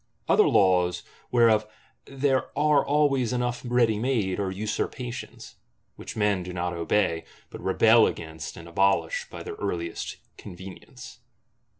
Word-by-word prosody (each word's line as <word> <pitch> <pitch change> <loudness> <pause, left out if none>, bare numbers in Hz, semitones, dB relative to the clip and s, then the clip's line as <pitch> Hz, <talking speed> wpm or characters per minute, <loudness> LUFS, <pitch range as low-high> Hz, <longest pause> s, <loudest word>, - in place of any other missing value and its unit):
Other - - +5
laws, 90 -2 +3 0.3
whereof 115 -3 +4 0.4
there 135 -1 0
are 150 -1 +4
always 140 -4 +2
enough 125 0 -1
ready 120 -3 +2
made, 110 -7 0
are 100 -2 -1
usurpations; 110 +5 -5 0.4
which - - -9
men 105 -3 +1
do 90 0 -7
not 90 0 -3
obey, 85 0 0 0.3
but - - -9
rebel - - +5
against, 80 +2 -6
and 85 -1 -10
abolish, 100 - +1
by - - -8
their 435 - -6
earliest 85 - -4 0.2
convenience. 95 +1 -11
105 Hz, 125 wpm, -26 LUFS, 90-125 Hz, 0.4 s, Other